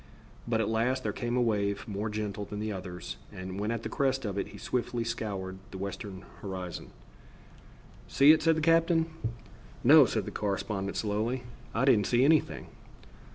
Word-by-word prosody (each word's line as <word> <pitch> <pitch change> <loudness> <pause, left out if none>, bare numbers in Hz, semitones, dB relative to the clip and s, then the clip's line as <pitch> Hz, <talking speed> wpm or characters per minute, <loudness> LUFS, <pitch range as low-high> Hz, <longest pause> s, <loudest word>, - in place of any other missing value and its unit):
But 115 -1 +1
at 105 - 0
last 120 +4 +1
there 105 - -1
came 120 +3 -2
a - - +3
wave 100 -2 0
more 105 +1 -3
gentle 105 -1 -3
than 105 +1 -6
the 110 0 -2
others, 90 -2 -6
and 95 +1 -6
when 105 +1 -1
at 115 -1 -2
the - - -2
crest 135 -3 0
of 100 -2 -2
it 100 - -2
he - - -11
swiftly 120 -1 -2
scoured 100 -5 -4
the - - -8
western 100 0 -6 0.2
horizon. 95 -3 -6 1.2
"See 140 +2 +7
it?" 155 - +5
said 165 -1 +4
the - - 0
captain. 165 0 +4 0.8
"No," - - +8
said - - -1
the - - -5
correspondent 100 -1 -2
slowly, 110 +4 -1 0.3
"I 120 +4 +2
didn't 105 -7 +4
see 125 +2 +4
anything." 155 +1 +2
110 Hz, 175 wpm, -30 LUFS, 100-125 Hz, 1.2 s, No